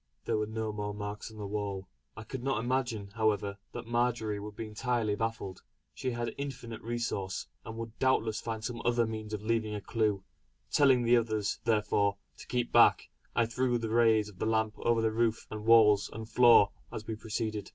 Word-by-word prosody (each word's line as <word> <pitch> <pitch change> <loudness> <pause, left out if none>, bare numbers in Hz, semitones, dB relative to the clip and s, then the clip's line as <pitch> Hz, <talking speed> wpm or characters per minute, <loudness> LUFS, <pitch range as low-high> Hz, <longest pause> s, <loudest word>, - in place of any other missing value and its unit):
There - - +1
were 105 - -1
no 110 0 -3
more 105 -1 -4
marks 105 +1 -5
on 110 - -13
the 105 - -5
wall. 100 -2 -3 0.3
I 110 - -6
could 125 +2 -6
not 135 0 0
imagine, 120 -4 -1
however, 105 -2 0
that - - -7
Marjory 120 -3 0
would 105 0 -8
be 115 - -5
entirely 110 0 -1
baffled. 110 -3 -3 0.3
She 130 - -3
had 120 -1 -3
infinite 125 -5 -6
resource, 115 -5 -3 0.2
and 110 0 -8
would 115 0 -7
doubtless 115 -4 +1
find 110 -1 -4
some 120 -1 -4
other 120 -1 +2
means 110 -1 -5
of 105 -1 -4
leaving 110 -1 0
a - - -3
clue. 105 -3 0 0.5
Telling 135 -4 +5
the 120 +1 +5
others 110 -3 -1
therefore 105 -2 +2 0.2
to - - -11
keep 125 -1 -1
back - - +5 0.3
I 115 - +4
threw 120 +1 0
the 115 -1 -3
rays 110 -2 +4
of 100 -4 -13
the - - 0
lamp 110 -1 +1
over 115 -1 +2
roof 115 0 0
and 110 0 -6
walls 105 -3 +6
and 110 +1 -7
floor 115 -3 +6 0.2
as 110 - -6
we 110 - -3
proceeded. 110 -1 -3
110 Hz, 195 wpm, -31 LUFS, 105-120 Hz, 0.5 s, walls